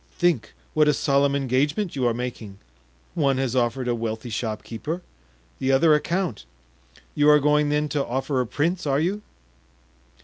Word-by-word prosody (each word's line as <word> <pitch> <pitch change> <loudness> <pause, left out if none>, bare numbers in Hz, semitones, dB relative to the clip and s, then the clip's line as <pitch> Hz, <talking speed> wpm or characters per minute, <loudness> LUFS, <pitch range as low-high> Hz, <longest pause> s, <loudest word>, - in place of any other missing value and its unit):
think 170 -11 0 0.2
what 155 -1 +4
a 150 - +4
solemn 140 -1 +2
engagement 145 - 0
you 130 -3 +1
are - - +2
making; 115 -5 -6 0.6
one 140 -4 +1
has 130 -2 -1
offered 125 +1 0
a 120 - +1
wealthy 115 0 -4
shopkeeper, 115 +9 -4 0.6
the 130 - +1
other 150 +4 +5
a 150 - +4
count; 175 - -2 0.7
you 145 0 +4
are 150 0 +7
going, 150 0 +2
then, 150 +1 +1
to 145 -1 -1
offer 130 +2 -1
a 125 - -3
prince, 165 +7 -1
are 140 0 +2
you?" 190 +6 -1
140 Hz, 165 wpm, -24 LUFS, 125-150 Hz, 0.7 s, are